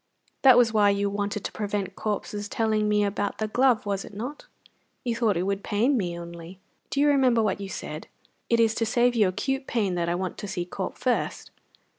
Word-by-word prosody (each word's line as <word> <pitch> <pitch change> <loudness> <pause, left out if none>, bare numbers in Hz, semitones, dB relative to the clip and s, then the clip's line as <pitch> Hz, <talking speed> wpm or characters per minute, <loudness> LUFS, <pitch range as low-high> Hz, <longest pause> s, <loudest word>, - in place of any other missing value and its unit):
That 260 -3 +8
was 235 -2 +4
why 210 -2 +5
you 200 0 +1
wanted 205 0 -2
to - - -3
prevent 205 -2 -3
Corp's 210 -1 -3
telling 215 -2 +1
me 210 0 +3
about 205 0 -2
the 215 - -1
glove, 245 0 +2
was 200 -1 -2
it 205 - -12
not? 265 - -6 0.6
You 240 -2 -1
thought 225 -6 +1
it 175 - 0
would 195 +1 -2
pain 235 +7 +2
me 175 -7 -1
only! 170 +1 -9 0.3
Do 280 - -2
you 290 - +4
remember 260 -5 +4
what 200 -1 -1
you 195 - -5
said: 155 -3 -6 0.4
'It 235 - +3
is 225 -1 +4
to 225 - 0
save 245 +1 +3
you 215 -4 +3
acute 270 +9 -2
pain 205 -6 0
that 170 -1 -1
I 170 - +1
want 185 0 -4
to 205 - -5
see 180 -2 -3
Corp 185 +1 -5
first'?" 250 -2 -1
210 Hz, 215 wpm, -26 LUFS, 195-235 Hz, 0.6 s, That